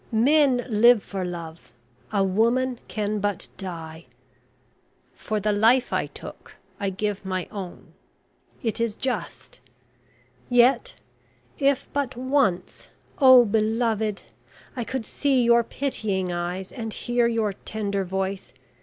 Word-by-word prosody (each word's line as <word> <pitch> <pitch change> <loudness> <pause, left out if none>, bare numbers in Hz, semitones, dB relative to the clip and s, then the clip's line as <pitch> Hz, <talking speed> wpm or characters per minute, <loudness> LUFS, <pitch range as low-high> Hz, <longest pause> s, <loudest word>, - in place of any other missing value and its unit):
Men 260 +2 +3
live 230 -1 +5
for 195 -2 -4
love 170 -2 -7 0.4
a 200 -2 +2
woman 235 +6 +1
can 210 -1 -2
but 205 -2 -2
die. 165 -4 -7 1.1
For 215 -1 -3
the 210 +1 0
life 225 +5 +3
I - - 0
took - - -11 0.2
I 200 -2 -1
give 205 +1 -3
my 185 -2 -3
own 190 -4 -8 0.7
it 230 0 -2
is 230 -3 -1
just... 260 +1 -5 0.9
Yet 250 - +3 0.6
if 280 -1 +2
but 275 -3 -1
once, 255 -8 0 0.3
oh, 260 -3 +8
beloved, 220 -1 0 0.5
I 245 - -2
could 260 0 -4
see 270 0 +1
your 235 0 +5
pitying 210 -9 -2
eyes, 175 +2 -4
and 225 -3 -5
hear 240 +1 0
your 225 -3 0
tender 200 -1 -3
voice... 190 +1 -4
220 Hz, 120 wpm, -24 LUFS, 195-245 Hz, 1.1 s, oh